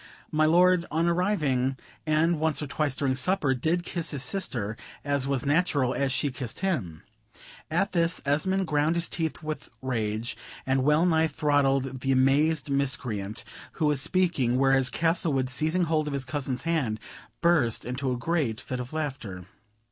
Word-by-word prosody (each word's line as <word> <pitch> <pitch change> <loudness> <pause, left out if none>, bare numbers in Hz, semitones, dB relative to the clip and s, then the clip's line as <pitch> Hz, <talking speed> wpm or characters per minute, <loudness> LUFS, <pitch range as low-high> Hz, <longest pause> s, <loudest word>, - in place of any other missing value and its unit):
My 155 0 +3
lord, 180 +1 +4
on 160 +2 +1
arriving, 150 -8 +1 0.3
and 155 +1 +2
once 160 -1 +1
or 150 - -3
twice 145 0 -1
during 135 -3 0
supper, 145 +1 +1
did 160 +7 0
kiss 170 -1 -2
his 140 -3 -2
sister, 120 - -2 0.3
as 140 -2 0
was 135 -2 0
natural, 145 -4 +2
and 140 -1 0
she 140 +2 0
kissed 125 0 -5
him." 115 - -2 0.7
At 175 +5 +1
this 170 0 +1
Esmond 190 +7 +1
ground 150 +1 +1
his 170 0 -1
teeth 160 -2 -3
with 155 0 -5
rage, 115 -3 -2 0.3
and 130 0 +1
wellnigh 160 +2 +3
throttled 135 -3 +1
the 135 +2 -1
amazed 140 +4 +3
miscreant 125 -7 -1 0.3
who 155 - -1
was 150 -3 +2
speaking, 145 -8 +1
whereas 135 -1 +3
Castlewood, 160 -6 +1
seizing 160 +7 +1
hold 155 -2 0
of 145 - -3
his 135 -1 -2
cousin's 135 -2 -3
hand, 150 -10 0 0.4
burst 160 -10 +2
into 130 +2 -2
a 125 - -1
great 140 -6 -1
fit 130 - -5
of 125 +3 -6
laughter. 135 - -4
145 Hz, 160 wpm, -27 LUFS, 130-165 Hz, 0.7 s, lord